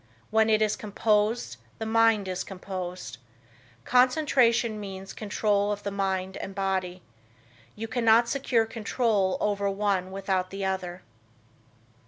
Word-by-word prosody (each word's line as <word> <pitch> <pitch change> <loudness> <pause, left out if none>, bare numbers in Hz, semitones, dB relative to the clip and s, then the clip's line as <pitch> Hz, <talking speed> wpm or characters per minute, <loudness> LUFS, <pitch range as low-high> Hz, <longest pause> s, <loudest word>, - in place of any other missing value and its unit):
When 220 0 +4
it 215 0 +4
is 215 - +1
composed, 215 +2 0 0.2
the 220 - -4
mind 225 -2 +3
is 185 -1 -2
composed. 180 - -6 0.7
Concentration 250 -4 +3
means 195 -1 -7
control 210 -1 0
of 205 0 -4
the 200 - -3
mind 190 -1 -2
and 195 - -7
body. 185 -2 -2 0.7
You 225 +1 -5
cannot 230 0 +4
secure 240 -3 +1
control 220 -3 0
over 200 -1 0
one 195 -2 0
without 190 -1 -1
the 195 0 -4
other. 185 -1 -3
205 Hz, 125 wpm, -27 LUFS, 190-225 Hz, 0.7 s, When